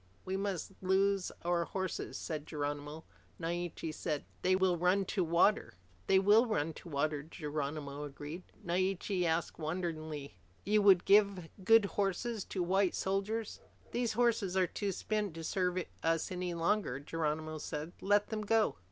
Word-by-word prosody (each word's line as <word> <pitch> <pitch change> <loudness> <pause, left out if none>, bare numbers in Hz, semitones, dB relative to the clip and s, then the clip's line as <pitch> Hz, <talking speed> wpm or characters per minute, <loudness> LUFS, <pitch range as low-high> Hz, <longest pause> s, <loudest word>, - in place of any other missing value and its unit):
We 190 - -2
must 195 -2 -2
loose 195 0 +2
our 175 0 +1
horses," 190 +1 -4
said 155 -1 -5
Geronimo. 145 +1 -4 0.4
Naiche 170 -1 -3
said, 155 -2 -3 0.2
"They 185 +1 +3
will 185 -1 +3
run 180 +3 +2
to 190 - +2
water." 170 - +3 0.3
"They 190 - +5
will 210 +5 +5
run 165 -8 0
to 170 - -11
water," 150 0 0
Geronimo 150 -2 -4
agreed. 145 +4 -7 0.2
Naiche 185 +1 0
asked 165 +1 0
wonderingly, 155 - -4 0.3
"You 210 +1 +4
would 195 -3 +6
give 200 -4 +4
good 225 +1 +6
horses 200 +3 -1
to 185 - -2
white 190 +1 +2
soldiers?" 200 +3 -2 0.3
"These 240 -2 0
horses 215 -5 +2
are 185 - +4
too 200 +3 -2
spent 210 -2 -2
to 165 - -6
serve 180 +1 0 0.2
us 165 +1 0
any 180 -1 -3
longer," 170 -5 0
Geronimo 155 +1 -2
said. 150 +2 -5
"Let 205 +1 +3
them 220 -1 -2
go." 215 - +2
180 Hz, 150 wpm, -33 LUFS, 160-200 Hz, 0.4 s, would